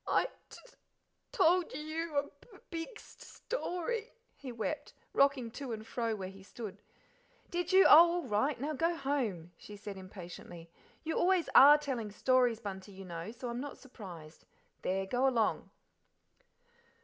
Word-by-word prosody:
"I - - +3 0.2
t - - -11
t - - -19 0.6
told 365 -6 +4
y - - -17
y - - -4
you 310 0 -4
a 285 - +3
b - - -13 0.2
b - - -13
big 335 +7 -5
st - - -16
st - - -12
story;" 445 0 -3 0.2
he 265 -3 -8
wept, 235 +6 -4 0.2
rocking 275 -4 +3
to 250 0 -5
and 220 0 -7
fro 230 -1 -2
where 190 -3 -5
he 195 0 -13
stood. 205 +1 -9 0.7
"Did 350 +1 -1
you? 380 +1 +7
Oh, 335 +2 +9
all 350 -1 -1
right! 245 +3 0
Now 295 +4 -2
go 330 +4 +1
home," 245 - -2
she 210 - -10
said 205 -1 -8
impatiently. 175 -3 -10 0.3
"You 320 0 -1
always 360 -1 +2
ARE 290 +2 +10
telling 255 -8 -4
stories, 245 0 +2
Bunty, 200 -2 -7
you 190 0 -10
know, 170 +3 -6
so 245 +1 -7
I'm 240 +1 -3
not 285 0 -7
surprised. 180 - -12 0.3
There 190 +1 -1
go 250 +7 +1
along." 235 -5 +1
255 Hz, 175 wpm, -33 LUFS, 205-320 Hz, 0.7 s, ARE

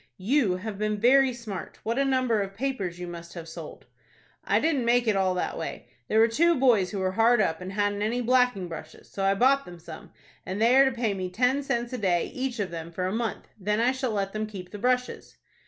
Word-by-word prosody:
"You 210 -1 +1
have 205 +1 -6
been 215 0 0
very 265 +4 +5
smart. 230 -6 -7
What 230 +4 -1
a 275 - +2
number 255 -5 +1
of 195 0 -5
papers 210 -8 -3
you 180 - -6
must 170 0 -9
have 165 -1 -7
sold!" 165 - -9 0.6
"I - - +2
didn't 300 -5 +1
make 240 0 +2
it 215 - +3
all 190 -1 +1
that 180 - -2
way. - - -6 0.2
There 220 - +1
were 225 - +6
two 335 +9 +3
boys 235 -8 +3
who 205 - -5
were 190 -1 0
hard 225 +4 +4
up, 165 -4 0
and 185 +1 -6
hadn't 205 0 0
any 225 +4 0
blacking 250 -6 +2
brushes; 160 -1 -10
so 195 - -4
I 195 0 +3
bought 270 +6 +4
them 175 -6 -11
some, 165 -1 -11 0.3
and 190 +2 -5
they 235 +3 +4
are 270 +1 +7
to 265 - +2
pay 235 -4 -1
me 185 -2 -4
ten 250 +8 +1
cents 245 -3 -2
a 250 - -3
day, 180 -4 0
each 255 -1 -3
of 200 -4 -2
them, 165 0 -6
for 180 +2 -3
a 185 - -2
month, 225 -1 -3
then 210 +2 0
I 240 +2 +3
shall 260 -1 -2
let 195 -2 -2
them 215 0 -2
keep 185 -4 -9
the 210 - -7
brushes." 250 +2 -1
215 Hz, 240 wpm, -26 LUFS, 185-250 Hz, 0.6 s, are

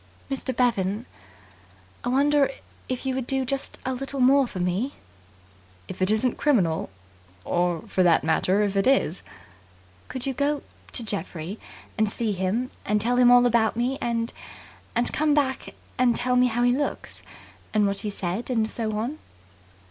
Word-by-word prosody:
"Mr. 270 0 -2
Bevan, 225 -3 0 1.0
I 245 - -1
wonder 280 +2 +3 0.4
if 255 +1 -3
you 265 - 0
would 260 -1 -3
do 265 -1 0
just 270 +1 -1
a 260 - 0
little 275 +2 -4
more 265 +1 +5
for 185 - -7
me?" 185 +10 -1 0.9
"If - - -8
it 185 - +2
isn't 220 +3 +1
criminal. 190 - +2 0.6
Or, 175 0 0
for 205 -4 -1
that 175 -3 +4
matter, 185 +5 +2
if 200 -1 -1
it 195 +3 +2
is." 260 - +2 0.9
"Could 255 -1 -4
you 270 - -1
go 285 +2 0 0.3
to 240 - +1
Geoffrey, 195 -2 -5 0.4
and 215 -1 +3
see 220 +1 -1
him, 200 +6 -1
and 210 +1 +1
tell 240 +4 +1
him 250 -1 +6
all 245 0 +7
about 230 -2 +3
me 255 +3 0
and 230 -1 -1 0.6
and 240 +1 +1
come 300 -1 +2
back 270 -3 -1 0.2
and 245 -2 +4
tell 250 +1 0
me 250 0 +5
how 240 0 0
he 245 - +4
looks, 285 +1 -4 0.5
and 210 -1 +3
what 200 0 0
he 210 - -3
said 200 +4 -3
and 250 - 0
and 220 - 0
so 220 -2 -2
on?" 245 +8 -3
240 Hz, 170 wpm, -25 LUFS, 205-260 Hz, 1.0 s, all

